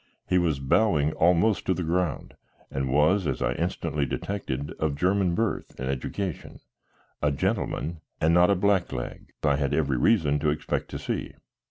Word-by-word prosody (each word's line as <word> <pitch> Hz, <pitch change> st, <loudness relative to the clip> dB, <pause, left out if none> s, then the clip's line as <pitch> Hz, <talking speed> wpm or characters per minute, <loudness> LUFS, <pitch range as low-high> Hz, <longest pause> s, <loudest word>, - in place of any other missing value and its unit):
He 90 Hz, -, +3 dB
was 80 Hz, -5 st, +1 dB
bowing 75 Hz, +2 st, +2 dB
almost 90 Hz, +5 st, +2 dB
to 95 Hz, -, +2 dB
the 90 Hz, -, -2 dB
ground, 85 Hz, -1 st, -1 dB, 0.4 s
and 65 Hz, -1 st, -2 dB
was, 80 Hz, +6 st, +3 dB
as -, -, -1 dB
I -, -, 0 dB
instantly 75 Hz, 0 st, -2 dB
detected, 70 Hz, -4 st, -3 dB
of 75 Hz, -2 st, 0 dB
German 90 Hz, +2 st, +1 dB
birth 115 Hz, +1 st, -2 dB
and 65 Hz, -, -3 dB
education, 85 Hz, +7 st, -4 dB, 0.6 s
a 75 Hz, -, +2 dB
gentleman, 85 Hz, -1 st, -2 dB, 0.2 s
and 80 Hz, +1 st, +3 dB
not 90 Hz, +2 st, +5 dB
a 100 Hz, -, +4 dB
blackleg 95 Hz, -10 st, -1 dB
I 70 Hz, -2 st, +3 dB
had 70 Hz, -1 st, 0 dB
every 70 Hz, -4 st, +1 dB
reason 75 Hz, -, +3 dB
to 75 Hz, -, +1 dB
expect 75 Hz, -, -2 dB
to -, -, -5 dB
see. -, -, -4 dB
80 Hz, 165 wpm, -26 LUFS, 70-95 Hz, 0.6 s, not